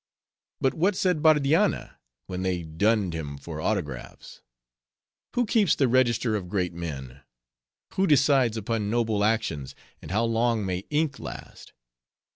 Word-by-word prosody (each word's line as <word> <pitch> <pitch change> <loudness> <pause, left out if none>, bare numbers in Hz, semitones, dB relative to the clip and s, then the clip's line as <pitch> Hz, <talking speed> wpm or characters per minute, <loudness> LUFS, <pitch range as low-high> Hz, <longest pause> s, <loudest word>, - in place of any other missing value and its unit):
But 135 - +1
what 185 +5 +1
said 180 -4 +1
Bardianna, 155 +5 +2 0.3
when 90 0 -5
they 90 -2 -1
dunned 95 +4 +1
him 75 -3 -5
for 80 +2 -7
autographs?—'Who 65 - -6
keeps 215 -5 +3
the 135 - +2
register 120 -2 +2
of 90 -4 -4
great 90 -3 -1
men? 70 -6 -7 0.7
who 190 +1 +1
decides 135 -6 +4
upon 110 -1 -2
noble 110 -2 +1
actions? 105 - -1 0.3
and - - -10
how 105 +5 +1
long 115 -1 +1
may 95 +1 -3
ink 150 -1 0
last? - - -9
110 Hz, 130 wpm, -26 LUFS, 85-135 Hz, 0.7 s, decides